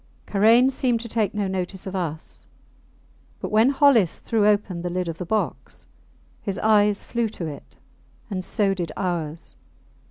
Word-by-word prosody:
Karain 230 +6 +4
seemed 250 -3 0
to 235 - -7
take 215 -3 -1
no 205 -2 0
notice 190 0 -4
of 190 0 -5
us, 160 -4 -5 1.0
but - - -5
when 220 +4 +5
Hollis 275 - +4
threw 215 -2 +1
open 205 -4 +1
the 175 - -3
lid 180 0 -2
of 165 -1 -5
the 180 - -5
box 220 +2 -3 0.6
his 200 -3 -4
eyes 210 -1 +3
flew 235 -2 -1
to 190 -5 -6
it 150 -3 -9 0.5
and 190 -4 -4
so 200 0 +1
did 175 -4 -4
ours. 170 -4 -3
200 Hz, 160 wpm, -23 LUFS, 180-220 Hz, 1.0 s, when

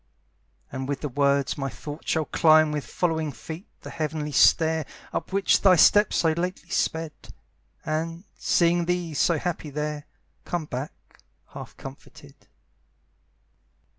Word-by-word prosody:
And 130 0 -4
with 140 -2 -2
the 150 - -3
words 140 +1 +1
my 135 0 -2
thoughts 145 +7 -8
shall 160 -1 +1
climb 155 -1 +4
With 150 -2 -3
following 160 -3 -1
feet 160 - -9
the - - -9
heavenly 155 -2 -3
stair 160 +2 +4 0.3
Up - - -3
which 195 0 +3
thy 190 -2 +6
steps 205 +5 +5
so 165 - +3
lately 175 +1 -4
sped, 160 -4 -1 0.7
And, 165 +3 -3
seeing 170 0 +2
thee 175 -2 -1
so 165 +3 +2
happy 165 -1 -3
there, 150 0 -4 0.4
Come 175 -3 -3
back 130 +1 -8 0.3
half - - -10
comforted. - - -12
155 Hz, 135 wpm, -25 LUFS, 150-170 Hz, 0.7 s, thy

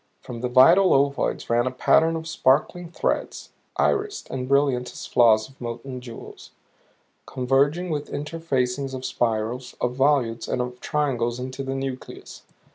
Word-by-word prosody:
From 115 -1 -8
the 125 - -1
vital 165 +10 +6
ovoids 140 0 0
ran 120 +1 +2
a - - +2
pattern 160 +5 +3
of 160 0 -5
sparkling 165 +4 +1
threads, 170 - -3 0.3
irised 415 -1 0
and 130 0 -4
brilliant 135 -3 +2
as - - -8
floss 110 -3 +4
of 135 -1 -22
molten 120 +2 -6
jewels; 120 -2 -11 0.8
converging 140 +7 +1
with 150 -1 -3
interfacings 140 -4 -2
of 130 0 -6
spirals, 120 +2 -2
of 125 - -1
volutes 135 -4 +1
and - - -1
of 125 0 -4
triangles 125 -6 -1
into 130 +1 -5
the 135 0 -3
nucleus. 135 -1 -7
130 Hz, 145 wpm, -24 LUFS, 125-145 Hz, 0.8 s, vital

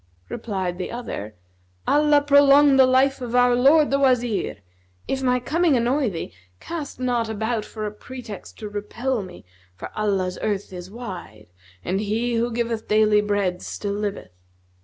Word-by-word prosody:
Replied 190 -5 -3
the 185 - -3
other, 110 - -6 0.5
"Allah 295 0 +4
prolong 285 0 +6
the 260 -1 +7
life 265 +1 +3
of 245 -1 -4
our 245 0 +5
lord 280 +5 +5
the 275 - +2
Wazir! 245 -5 +1 0.5
If 265 - -2
my 250 -1 +2
coming 310 +3 +2
annoy 250 +2 +1
thee, 165 -4 -6 0.3
cast 300 - -6
not 240 -3 0
about 220 +1 -2
for 215 -1 -6
a 210 - -3
pretext 225 -1 -10
to 215 - -6
repel 215 +4 -3
me, 185 - -11 0.3
for - - -8
Allah's 195 -4 -1
earth 205 -2 -2
is 180 0 -8
wide 180 - -9 0.3
and 190 +2 0
He 225 +4 -1
who 235 +1 0
giveth 230 -1 -2
daily 215 -1 +4
bread 200 -3 -1
still 205 -1 -4
liveth. 205 - -4
230 Hz, 160 wpm, -23 LUFS, 205-260 Hz, 0.5 s, the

